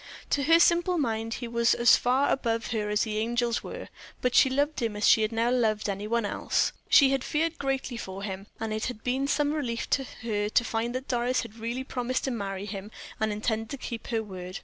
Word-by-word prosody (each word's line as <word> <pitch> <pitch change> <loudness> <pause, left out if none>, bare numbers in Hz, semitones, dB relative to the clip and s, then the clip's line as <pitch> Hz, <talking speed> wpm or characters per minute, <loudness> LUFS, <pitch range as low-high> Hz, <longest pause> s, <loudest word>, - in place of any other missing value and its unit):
To 285 - +2
her 330 +2 +6
simple 345 +1 +3
mind 225 -5 -1
he 245 - -5
was 235 0 +2
as 235 - +6
far 260 +3 +2
above 230 -3 -1
her 210 -3 -1
as 210 0 +2
the 215 -1 -2
angels 235 +1 0
were; - - -7 0.3
but 250 -1 0
she 265 - +6
loved 285 +2 0
him 225 -3 -1
as 210 - +1
she 220 -1 +5
never 230 +3 +1
loved 215 -4 +1
any 200 +1 -3
one 235 0 0
else. - - 0 0.2
She 275 -4 +7
had 270 -1 0
feared 325 +2 -1
greatly 270 -3 -2
for 195 -3 -6
him, 195 0 -5
and 225 -1 -3
it 215 - -2
had 235 -4 -5
been 265 +2 0
some 290 +1 +1
relief 245 -7 -2
to 270 - +2 0.2
her 210 -2 -1
to 240 - +3
find 235 +1 -2
that 260 +1 -4
Doris 245 0 +1
had 230 -1 -10
really 235 +3 -3
promised 255 -1 -2
to 265 - -1
marry 200 -4 -4
him 200 0 -6 0.3
and 220 0 +1
intended 220 +1 -2
to 280 - -5
keep 235 -3 -6
her 225 -2 -1
word. 185 -3 -7
235 Hz, 225 wpm, -27 LUFS, 215-260 Hz, 0.3 s, She